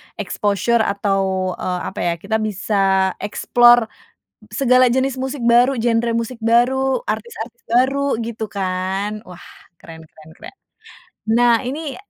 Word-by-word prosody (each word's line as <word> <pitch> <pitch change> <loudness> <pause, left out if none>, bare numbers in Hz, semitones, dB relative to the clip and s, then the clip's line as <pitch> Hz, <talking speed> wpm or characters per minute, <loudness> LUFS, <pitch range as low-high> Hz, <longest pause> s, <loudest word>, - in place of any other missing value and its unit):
exposure, 205 +3 0
atau, 195 -3 -1
eee, 180 -1 -2
apa - - -9
ya, 170 - +1
kita 200 +6 -3
bisa 195 -2 0
explore 240 +2 +4 0.6
s 210 - -7
segala 255 0 +5
jenis 260 +2 0
musik 265 +1 -4
baru, 245 +2 +4
genre 235 0 +1
musik 230 +1 -3
baru, 250 +3 +2
artis-artis 225 +2 -6
baru 270 +2 +1
gitu 225 -1 -5
kan. 195 +2 -3
Wah, 180 -1 -13 0.4
keren 160 -1 -12
keren 155 0 -18
keren. - - -12 0.7
Nah, 235 +1 +3
ini 285 +2 -5
225 Hz, 130 wpm, -19 LUFS, 195-245 Hz, 0.7 s, segala